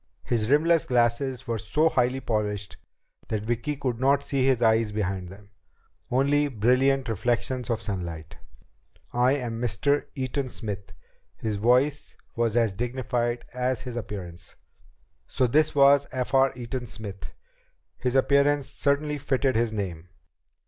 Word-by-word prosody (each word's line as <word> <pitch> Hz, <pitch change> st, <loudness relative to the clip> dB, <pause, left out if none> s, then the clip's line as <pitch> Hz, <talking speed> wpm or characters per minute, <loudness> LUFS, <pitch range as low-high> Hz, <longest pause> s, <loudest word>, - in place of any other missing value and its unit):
His 115 Hz, -2 st, 0 dB
rimless 160 Hz, +3 st, +4 dB
glasses 125 Hz, +1 st, +1 dB
were 115 Hz, -2 st, -2 dB
so 150 Hz, +10 st, +1 dB
highly 130 Hz, -2 st, +1 dB
polished 105 Hz, -4 st, -2 dB, 0.5 s
that 105 Hz, -2 st, -2 dB
Vicki 120 Hz, +6 st, -2 dB
could 125 Hz, -4 st, -3 dB
not 140 Hz, +2 st, +3 dB
see 135 Hz, -2 st, 0 dB
his 130 Hz, -2 st, +3 dB
eyes 110 Hz, -2 st, +3 dB
behind 95 Hz, -3 st, -2 dB
them, 100 Hz, +2 st, -14 dB, 0.6 s
only 140 Hz, +3 st, +2 dB
brilliant 130 Hz, +3 st, +2 dB
reflections 120 Hz, +3 st, -1 dB
of 115 Hz, -1 st, -1 dB
sunlight. 85 Hz, -6 st, -5 dB, 0.8 s
"I 125 Hz, +2 st, +3 dB
am 120 Hz, -5 st, -3 dB
Mr. 125 Hz, +5 st, +1 dB
Eaton 130 Hz, 0 st, -2 dB
Smith." 105 Hz, -5 st, -5 dB, 0.4 s
His 110 Hz, -2 st, -3 dB
voice 125 Hz, +7 st, +1 dB, 0.2 s
was 115 Hz, -1 st, +1 dB
as 115 Hz, -4 st, +2 dB
dignified 120 Hz, +1 st, -2 dB
as 125 Hz, -1 st, -1 dB
his 125 Hz, -2 st, -7 dB
appearance. 95 Hz, -7 st, -7 dB, 0.7 s
So 130 Hz, -, +1 dB
this 150 Hz, +6 st, +2 dB
was 140 Hz, 0 st, +5 dB
F. 130 Hz, 0 st, -3 dB
R. 135 Hz, 0 st, +5 dB
Eaton 120 Hz, 0 st, -5 dB
Smith! 100 Hz, -, -7 dB, 0.7 s
His 125 Hz, +1 st, -1 dB
appearance 140 Hz, +1 st, +3 dB
certainly 150 Hz, +1 st, 0 dB
fitted 135 Hz, -2 st, 0 dB
his 115 Hz, 0 st, +1 dB
name. 90 Hz, -5 st, -5 dB
120 Hz, 135 wpm, -26 LUFS, 110-135 Hz, 0.8 s, was